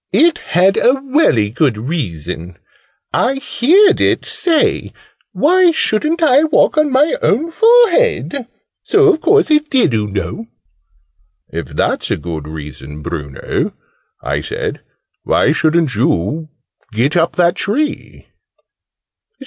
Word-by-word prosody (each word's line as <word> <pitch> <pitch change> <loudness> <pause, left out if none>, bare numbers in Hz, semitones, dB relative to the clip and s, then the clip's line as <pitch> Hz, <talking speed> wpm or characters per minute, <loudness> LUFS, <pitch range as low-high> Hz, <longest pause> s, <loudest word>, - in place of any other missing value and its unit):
"It 335 0 +3 0.2
had 190 +2 +3
a 250 +3 +3
welly 260 - +1
good 125 -1 0
reason. 90 - -5 0.6
I 265 - +1
heerd 355 - +2
it - - +1
say 330 -4 0 0.4
'Why 360 +4 +3
shouldn't 315 +2 0
I 290 -1 +4
walk 310 - +2
on 305 -2 +1
my 290 +4 +2
own 315 +10 0
forehead?' 455 - +2 0.3
So 410 -1 +3
a 315 - -3
course 415 -2 +2
it 300 0 +2
did, 250 - +2
oo 105 -1 -1
know!" 105 - -5 1.0
"If - - -6
that's - - -2
a - - -1
good 80 -1 -7
reason, 75 -1 -9
Bruno," 70 -5 -4 0.5
I - - -2
said, - - -5 0.4
"why - - +1
shouldn't 160 -3 +1
you 125 - -1 0.4
get 120 +8 0
up 170 -1 +1
that 175 -1 +2
tree?" 290 +9 -3
220 Hz, 125 wpm, -15 LUFS, -, 1.0 s, I